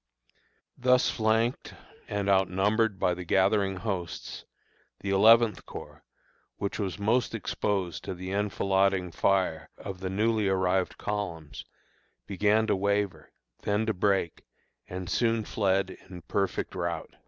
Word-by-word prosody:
Thus 125 0 +4
flanked 110 +2 0 0.3
and 100 -1 -2
outnumbered 100 +3 +2
by 90 - +1
the 90 +1 -6
gathering 95 +2 +2
hosts, 95 -4 -5 0.6
the 100 - -2
Eleventh 110 +3 +5
Corps, - - -10 0.5
which 100 +2 -3
was 95 -3 -2
most 115 +4 +1
exposed 100 -4 -2
to 95 - -4
the 95 +1 -6
enfilading 95 -2 +1
fire 95 -3 +1
of 95 -2 -7
the 95 0 -3
newly 110 +2 +1
arrived 95 -1 +1
columns, 85 -8 -4 0.6
began 105 +3 +2
to - - +2
waver, 100 -5 -1 0.3
then 105 +1 0
to 110 - 0
break, 95 -3 0 0.5
and 90 0 -5
soon 115 0 +1
fled 95 -2 +1
in 90 -2 -12
perfect 100 +3 -2
rout. 85 -3 -3
100 Hz, 125 wpm, -28 LUFS, 95-105 Hz, 0.6 s, Eleventh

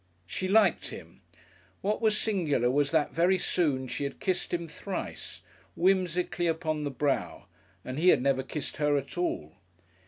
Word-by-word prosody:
She 185 - -3
liked 200 -2 +4
him. - - -11 0.6
What 210 +3 0
was 215 -2 +3
singular 155 - +1
was 145 +1 +2
that 155 -1 +1
very 180 +3 +3
soon 140 -9 0
she 140 - -3
had 140 - -4
kissed 185 -2 -1
him 170 -1 -2
thrice, 190 +4 -6 0.3
whimsically 180 -1 +1
upon 160 -2 -1
the - - -1
brow, 135 -6 -1 0.4
and 130 +3 -4
he 180 +3 +5
had - - +6
never 135 -1 +2
kissed 140 +2 -5
her 150 -1 +2
at 140 0 -5
all. 125 - -2
160 Hz, 160 wpm, -29 LUFS, 140-185 Hz, 0.6 s, had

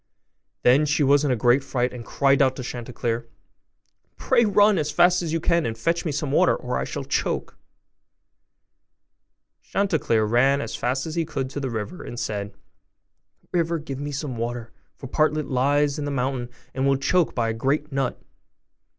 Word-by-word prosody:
Then 140 +5 +5
she 150 0 +2
was 140 +1 +4
in 145 - +1
a 125 - +2
great 120 +4 +3
fright, 125 -1 -1
and 120 -2 -7
cried 140 +3 +2
out 130 -1 +3
to 130 - -6
Chanticleer, 120 -1 -4 0.9
'Pray 235 - +3
run 205 -1 +4
as 150 -1 -1
fast 175 +3 +4
as 165 -3 -3
you 165 - 0
can, 170 +1 +2
and 115 -1 -3
fetch 165 +10 0
me 160 - 0
some 140 0 -2
water, - - +4
or - - -4
I - - -2
shall - - -5
be - - -16
choked.' - - -1 2.1
Chanticleer 160 - +1
ran 130 +5 +3
as - - -4
fast 130 +2 -1
as 160 - -5
he 170 0 0
could 135 -4 -4
to 145 - -4
the 135 -2 -3
river, 115 - -5
and 120 - -7
said, 105 -3 -4 1.0
'River, 170 -1 +1
give 140 -4 -6
me 145 +1 -4
some 140 -3 -4
water, 115 0 -4 0.2
for - - -10
Partlet 155 +2 +1
lies 145 +3 +2
in 145 - -3
the - - -2
mountain, 130 -2 -2 0.2
and 135 +1 0
will 140 - +4
be 135 - -6
choked 180 +3 +2
by 115 -2 0
a - - -1
great 140 +6 -1
nut. 135 -2 -1
140 Hz, 190 wpm, -24 LUFS, 125-155 Hz, 2.1 s, Then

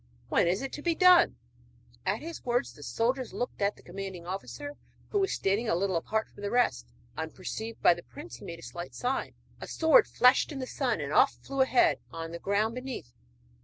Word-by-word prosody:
When - - +3
is 185 +8 +1
it 270 - -5
to 295 - -5
be 335 +1 +1
done?' 365 0 +6 0.7
At - - 0
his 335 +1 -7
words 245 +1 0
the 145 - -15
soldiers 245 - -1
looked 245 - -4
at 200 +1 +2
the - - -19
commanding 190 -1 -7
officer, 290 +10 -6 0.4
who 410 - +2
was 390 0 +1
standing 205 +4 0
a - - +3
little 190 +1 0
apart 220 +6 -1
from - - -15
the 205 - -2
rest. 240 - +1 0.3
Unperceived 190 +7 -6
by - - +8
the 175 - -9
prince 120 -7 -10
he - - -12
made 170 - -6
a 165 - -14
slight 175 0 -7
sign, 255 +2 -2 0.2
a - - -7
sword 330 +9 +5
flashed 250 +5 +4
in 290 - -5
the 260 - -3
sun, - - -1
and - - -4
off - - +5
flew 275 -1 -1
a 260 - +5
head 155 - +4
on 165 0 -6
the 170 - -6
ground 205 +4 +1
beneath! 250 - -6
220 Hz, 215 wpm, -29 LUFS, 175-265 Hz, 0.7 s, by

